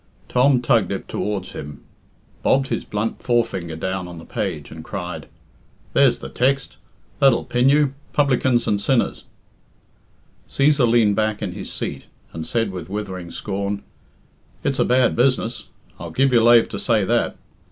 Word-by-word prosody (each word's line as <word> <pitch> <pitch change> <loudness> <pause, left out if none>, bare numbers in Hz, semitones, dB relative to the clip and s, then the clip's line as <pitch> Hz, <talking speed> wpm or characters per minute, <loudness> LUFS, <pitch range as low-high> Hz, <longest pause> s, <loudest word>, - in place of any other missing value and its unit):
Tom 125 0 +3
tugged 115 -4 +2
it 100 - -4
towards 100 -3 -3
him, 75 -1 -8 0.6
bobbed 135 0 +2
his 115 - -2
blunt 105 +2 -3
forefinger 115 -9 0
down 95 +2 -3
on 90 -1 -9
the 80 - -10
page, 85 -8 -4
and 80 0 -9
cried, 90 -5 -6 0.7
"There's - - +4
the 65 - -8
text 135 - 0 0.4
that'll 135 -4 +4
pin 125 +2 +2
you 145 -1 +3 0.2
publicans 130 -4 +2
and 100 -1 0
sinners." 130 +3 0 1.2
Cæsar 140 -3 +3
leaned 115 -3 +4
back'in 105 -2 -1
his 95 +2 -7
seat, - - -4 0.3
and 80 -1 -5
said 115 -4 0
with 90 -2 -7
withering 95 -4 -5
scorn, 100 +1 -4 0.8
"It's - - -1
a - - +4
bad 125 0 +3
business 120 -3 +1 0.3
I'll 85 - -6
give 135 +10 +2
you 120 - +6
lave 120 0 +6
to - - -5
say - - +2
that. - - 0
110 Hz, 150 wpm, -21 LUFS, 95-125 Hz, 1.2 s, you